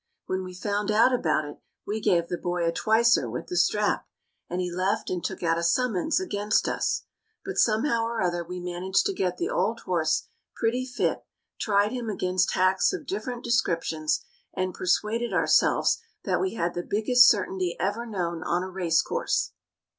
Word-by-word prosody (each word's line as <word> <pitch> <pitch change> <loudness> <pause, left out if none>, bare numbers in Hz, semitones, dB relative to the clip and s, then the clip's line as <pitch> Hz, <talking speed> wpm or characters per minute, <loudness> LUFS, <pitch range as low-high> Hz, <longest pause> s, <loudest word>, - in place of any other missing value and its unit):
When 185 0 -2
we 185 -1 -8
found 205 +2 -2
out 225 +4 +4
about 155 -10 +1
it 145 - -9 0.3
we 215 +2 -2
gave 170 -4 +2
the 175 - -2
boy 175 -1 -1
a - - +2
twicer 220 - +3
with 120 - -5
the - - -5
strap, 205 +4 +1 0.4
and 180 - -2
he 180 -1 -2
left 185 +4 -1
and 180 -2 -2
took - - -4
out 165 0 +2
a - - -3
summons 235 - +1
against 210 - 0
us. - - -1 0.4
But 390 0 -3
somehow 230 +1 +2
or 230 0 -3
other 175 -2 0
we 180 +2 -7
managed 180 - 0
to 395 - 0
get 185 - -1
the 360 +6 -2
old - - 0
horse - - 0 0.3
pretty 250 +3 0
fit, 250 - -1 0.4
tried 205 0 +2
him 245 -3 -4
against 185 -2 0
hacks 185 - +3
of 345 -6 -5
different 240 +2 -4
descriptions, 165 -9 0 0.3
and 185 0 -1
persuaded 215 +5 0
ourselves 165 -3 +3 0.2
that - - 0
we 380 -7 -1
had 170 -3 -1
the 175 - -2
biggest 245 +6 +5
certainty 190 -4 0
ever 205 +6 -1
known 170 -6 -3
on 175 +2 0
a 190 - -5
racecourse. 175 -4 0
190 Hz, 175 wpm, -26 LUFS, 175-230 Hz, 0.4 s, biggest